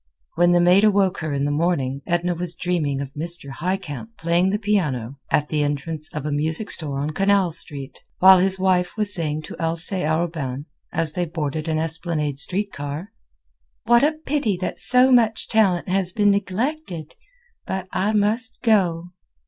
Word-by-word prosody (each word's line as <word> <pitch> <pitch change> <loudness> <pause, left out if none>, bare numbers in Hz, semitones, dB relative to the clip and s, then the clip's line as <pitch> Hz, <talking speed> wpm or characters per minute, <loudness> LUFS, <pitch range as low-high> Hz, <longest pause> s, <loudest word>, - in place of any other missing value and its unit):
When 175 +1 +3
the 175 - +4
maid 180 +3 +5
awoke 200 -2 +3
her 155 -2 -4
in 140 0 -1
the 145 - 0
morning 145 -4 -1
Edna 175 0 0
was 175 0 -3
dreaming 160 -6 -1
of 140 -1 -7
Mr. 165 -1 -3
Highcamp 185 - -5
playing 170 +1 +1
the 205 - 0
piano 150 - -1
at 150 0 +1
the 150 -1 0
entrance 150 +2 -3
of 150 -2 -5
a 150 - -2
music 160 +8 -1
store 145 -4 0
on 145 +2 -2
Canal 195 +1 +2
Street, 140 -3 -4 0.2
while 190 0 +7
his 190 +1 +2
wife 185 0 +1
was 210 -1 +2
saying 155 -3 -2
to - - -9
Alcée 170 +3 +1
Arobin, 155 -4 -2 0.3
as 160 -2 -1
they 175 +1 -1
boarded 155 -1 -4
an 160 -1 0
Esplanade 160 -3 -2
Street 195 +7 -1
car: 145 +8 -6 0.7
"What 240 0 +4
a 305 +2 +3
pity 290 - -2
that 185 - -4
so 255 +1 +4
much 225 -3 +3
talent 195 -6 +2
has 185 -1 0
been 205 -2 +3
neglected! 200 - -3 0.5
but 190 -1 -4
I 205 +3 0
must 220 +3 +2
go." 180 -7 +1
175 Hz, 175 wpm, -22 LUFS, 150-200 Hz, 0.7 s, while